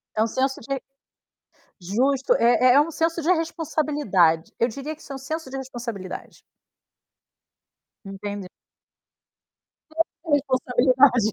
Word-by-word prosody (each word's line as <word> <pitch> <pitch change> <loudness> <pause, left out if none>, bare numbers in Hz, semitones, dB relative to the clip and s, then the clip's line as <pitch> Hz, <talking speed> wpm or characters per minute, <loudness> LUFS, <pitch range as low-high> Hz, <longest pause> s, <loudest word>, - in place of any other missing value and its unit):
É 215 - +1
um 225 - +3
senso 265 +3 -1
de 270 +3 -3 1.0
justo, 255 +9 +1
é 245 +2 +5
é 280 - +7
um 305 - -1
senso 330 +1 0
de 320 - -1
responsabilidade. 295 - +1
Eu 235 - +3
diria 280 +6 -6
que 310 - -21
isso - - -12
é - - -4
um - - -5
senso 290 +2 -5
de 270 - -5
responsabilidade. 240 -7 -7 1.7
Entendi 200 0 -6 1.4
Senso 325 +1 -3
de 295 - +4
responsabilidade. 255 -3 +3
260 Hz, 125 wpm, -24 LUFS, 225-295 Hz, 1.7 s, é